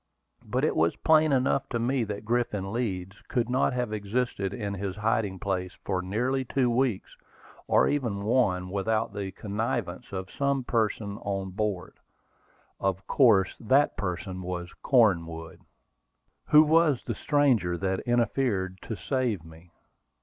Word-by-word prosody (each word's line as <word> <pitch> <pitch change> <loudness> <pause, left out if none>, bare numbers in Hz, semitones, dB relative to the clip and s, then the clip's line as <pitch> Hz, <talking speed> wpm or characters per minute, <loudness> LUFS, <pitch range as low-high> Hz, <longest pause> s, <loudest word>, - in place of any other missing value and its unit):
But - - -2
it - - 0
was 80 +1 +2
plain 155 -1 +4
enough 135 0 +1
to 120 - -1
me 120 +2 0
that 105 0 -6
Griffin 115 -4 -1
Leeds 95 -5 -3
could 120 -1 -1
not 130 +2 +2
have 125 -3 -2
existed 105 -1 -2
in 100 -1 -4
his 100 -1 -4
hiding 105 -2 0
place 90 -1 -3
for 95 -2 0
nearly 125 +8 -1
two 125 -1 +1
weeks, 120 -5 0 0.5
or - - +4
even 120 -9 -1
one, 100 -6 +1
without 110 +2 0
the 100 -2 -4
connivance 105 +3 -3
of 95 -1 -5
some 140 -1 0
person 110 -3 -1
on 95 -2 -3
board. 100 -2 -3 0.8
Of 95 -1 -1
course 105 -9 +4
that 135 +6 +3
person 95 0 -4
was 90 -1 -5
Cornwood. 85 -10 +1 0.9
Who 150 +1 +8
was 155 -3 +3
the - - -2
stranger 125 - +2
that 95 +2 -1
interfered 115 -6 0
to 110 - -5
save 120 - -1
me? 80 +2 -15
105 Hz, 140 wpm, -27 LUFS, 95-125 Hz, 0.9 s, Who